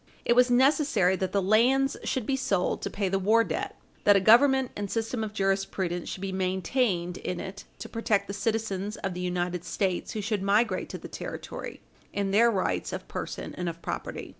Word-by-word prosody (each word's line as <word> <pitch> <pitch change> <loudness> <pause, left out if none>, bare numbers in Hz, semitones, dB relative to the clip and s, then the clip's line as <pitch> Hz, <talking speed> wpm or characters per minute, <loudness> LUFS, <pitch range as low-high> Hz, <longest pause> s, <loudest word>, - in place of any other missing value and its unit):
It 235 - +4
was 250 0 +5
necessary 260 - +3
that 185 -1 -2
the 200 -1 +1
lands 250 +7 +3
should 255 -4 -1
be 270 - +1
sold 195 -8 0
to - - -3
pay 200 -1 -2
the 195 +1 0
war 220 +4 +4
debt; - - -4 0.3
that 205 - +6
a - - +6
Government 260 +5 +5
and 205 -1 -4
system 225 +1 -2
of 215 - -4
jurisprudence 195 -3 -1
should 190 - -6
be 195 -1 -3
maintained 185 0 0
in 180 - -4
it 195 +1 -7
to - - -7
protect 225 -3 0
the 200 - -5
citizens 210 -1 -2
of 195 -2 -3
the 180 - -5
United 180 -1 -2
States 180 +1 -2
who 215 - -3
should 210 -1 -1
migrate 200 0 +1
to - - -5
the - - -9
territory, - - -7 0.3
in 200 -1 -1
their 230 +4 +5
rights 195 -5 -1
of - - -6
person - - -5
and 180 -1 -3
of 165 0 -8
property. - - -5
200 Hz, 200 wpm, -27 LUFS, 185-230 Hz, 0.3 s, that